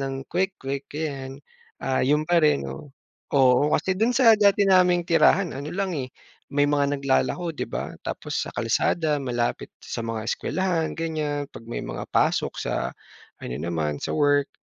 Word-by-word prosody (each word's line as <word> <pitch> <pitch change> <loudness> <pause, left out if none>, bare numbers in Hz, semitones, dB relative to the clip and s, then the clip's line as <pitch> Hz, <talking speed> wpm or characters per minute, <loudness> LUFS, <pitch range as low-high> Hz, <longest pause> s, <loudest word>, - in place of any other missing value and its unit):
ng 135 0 -4
kwek-kwek 160 -7 -2
ayan. 135 -3 -4 0.4
Ah, 130 -1 0
'yun 150 +3 +2
pa 175 -1 +4
rin 110 - +3
'no, 70 - -8 0.5
oo. 135 +2 +5
Kasi 190 - -1
dun 225 +4 +2
sa 230 -4 +7
dati 200 -1 +4
naming 180 -2 +4
tirahan 175 +2 +4
ano 140 +2 -5
lang 190 -1 -2
eh, 130 -2 -3 0.4
may 145 0 +3
mga 145 -1 +1
naglalako 160 +5 0
di - - -2
ba, - - -4
tapos - - -3
sa - - -7
kalsada, 155 -3 +1
malapit 120 -2 -2
sa 115 - -5
mga 115 -1 -3
eskuwelahan 180 0 -1
ganiyan, 155 -3 -2
pag 115 - -10
may - - -3
mga - - -5
pasok - - +1
sa 60 +1 -2 0.5
ano 60 - -5
naman, 80 -3 -2
sa - - -3
work. 145 -1 +3
145 Hz, 165 wpm, -25 LUFS, 130-175 Hz, 0.5 s, sa